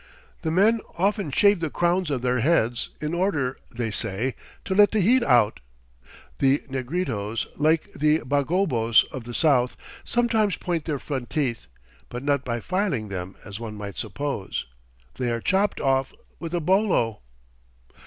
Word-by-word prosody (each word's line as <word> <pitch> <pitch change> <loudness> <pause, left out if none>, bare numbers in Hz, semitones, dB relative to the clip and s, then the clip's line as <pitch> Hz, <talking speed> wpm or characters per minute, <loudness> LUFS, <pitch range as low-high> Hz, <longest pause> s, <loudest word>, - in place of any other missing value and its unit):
The 160 - -1
men 210 +7 +3 0.2
often 200 -1 +1
shave 200 +6 +4
the 165 -2 -2
crowns 175 +2 +1
of 130 -4 -2
their 125 0 +1
heads 120 -4 +1
in 155 +2 -3
order, 155 -8 0
they 115 -2 -3
say, 110 +5 -2 0.3
"to 190 - -1
let 205 +1 +6
the 220 - 0
heat 240 +7 +4
out." 120 - +3 0.8
The 135 +2 +3
Negritos, 125 - -2
like 155 +2 +1
the 155 +2 +2
Bagobos 140 - +3
of 125 -3 -7
the 120 0 -6
south, 130 -6 +3 0.3
sometimes 225 -4 +1
point 170 -3 -2
their 150 -3 -1
front 130 -3 -5
teeth, 125 - -2 0.4
but 125 +2 -6
not 140 -1 +1
by 120 -2 -3
filing 180 - -1
them 95 0 -5
as 100 0 -7
one 110 -2 -6
might 100 -2 -6
suppose. 140 -9 -3 0.5
They 125 -2 0
are 115 - -1
chopped 195 - +1
off 135 0 +1 0.3
with 170 0 -4
a - - +1
bolo. 175 - +1
140 Hz, 155 wpm, -25 LUFS, 120-180 Hz, 0.8 s, let